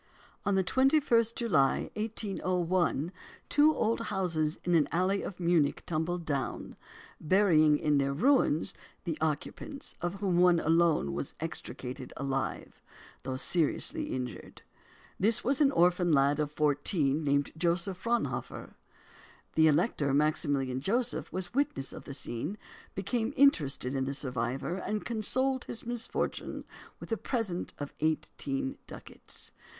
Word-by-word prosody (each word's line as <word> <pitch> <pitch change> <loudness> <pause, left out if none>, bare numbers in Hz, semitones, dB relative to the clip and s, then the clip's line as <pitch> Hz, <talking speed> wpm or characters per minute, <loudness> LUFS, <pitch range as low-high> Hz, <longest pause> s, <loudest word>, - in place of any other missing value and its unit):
On 205 - +2
the 190 - +3
21st 260 - +3
July, 180 - +2
1801, 185 -6 -1 0.4
two 300 +1 +5
old 225 +1 +1
houses 165 -6 0
in 175 - 0
an 160 -3 +4
alley 185 +5 +1
of 190 - -6
Munich 170 -5 +2
tumbled 170 +1 -2
down, 140 -4 -3 0.4
burying 155 -4 +4
in 145 -1 +2
their 140 0 +1
ruins 170 - +2 0.3
the 165 - -2
occupants, 160 - -3
of 175 +2 -2
whom 190 -3 0
one 180 -1 +5
alone 165 - +2
was - - -4
extricated 125 +1 -5
alive, 135 0 -3 0.4
though 130 0 -4
seriously 180 - +1
injured. 125 -1 -6 0.6
This 220 +3 +3
was 275 +4 +1
an 285 - +6
orphan 175 -4 +3
lad 140 0 +3
of 150 -1 -1
fourteen 150 0 +1
named 140 0 +1
Joseph 175 +3 0
Fraunhofer. 235 0 -2 0.8
The 160 0 +5
Elector 150 - +2
Maximilian 140 -3 +1
Joseph 235 - -1
was 185 +2 -4
witness 245 - -1
of - - -9
the 140 - -6
scene, 145 - -4 0.4
became 220 +6 -1
interested 150 - +3
in 135 -1 0
the 140 +1 -3
survivor, 130 +5 -2
and 210 +2 -3
consoled 255 +4 +1
his 230 - -5
misfortune 240 0 -3 0.4
with - - -10
a 225 - +1
present 215 -9 -3
of 145 -1 -6
eighteen 140 -3 -2
ducats. - - -8
170 Hz, 130 wpm, -30 LUFS, 145-210 Hz, 0.8 s, an